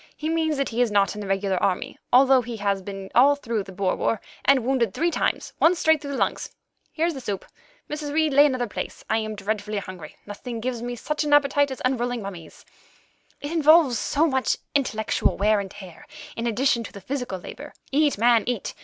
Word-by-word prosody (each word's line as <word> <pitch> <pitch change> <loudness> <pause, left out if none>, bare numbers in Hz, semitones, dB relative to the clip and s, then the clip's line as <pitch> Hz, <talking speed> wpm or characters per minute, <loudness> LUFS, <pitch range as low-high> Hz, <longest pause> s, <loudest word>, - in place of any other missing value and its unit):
He 310 - -3
means 320 -2 0
that 275 - -1
he 235 +1 -1
is 245 - +3
not 200 -2 +2
in 210 - -7
the 200 - -6
regular 195 -1 0
army, 185 - -1 0.2
although 265 +1 +6
he 235 -1 -6
has 200 -1 0
been 195 0 -8
all 275 +4 +6
through 235 -6 -3
the 195 0 -9
Boer 190 0 -1
War, 225 - 0 0.2
and 270 -4 +4
wounded 245 -6 +1
three 340 +2 +1
times, - - -1
once 345 +2 +4
straight 315 -2 +3
through 280 -1 -5
the - - -3
lungs. - - -1 0.4
Here's 335 +1 0
the 270 - -7
soup. 205 -5 -4 0.4
Mrs. 300 -1 -5
Reid, 310 -1 +1
lay 290 +2 +7
another 255 -3 -1
place. 220 - -6
I 220 - +3
am 215 -1 -4
dreadfully 210 +1 -3
hungry; 185 -5 -8
nothing 225 +3 -7
gives 240 0 -3
me 245 0 -4
such 300 +6 -2
an 295 -1 0
appetite 285 0 +4
as 265 - -7
unrolling 245 -2 -1
mummies; 175 -5 -10 0.8
it 285 - -5
involves 310 -5 +5
so 300 +3 +1
much 265 -4 +1 0.2
intellectual 220 -6 0
wear 210 +2 +3
and 195 -1 -5
tear, 185 -4 -12 0.3
in 230 +1 -2
addition 235 +1 +1
to - - -9
the 200 - -10
physical 250 -4 -4
labour. 290 - -10 0.2
Eat, 290 -2 +2
man, 230 0 +4
eat. 245 -5 -2
245 Hz, 210 wpm, -24 LUFS, 205-285 Hz, 0.8 s, lay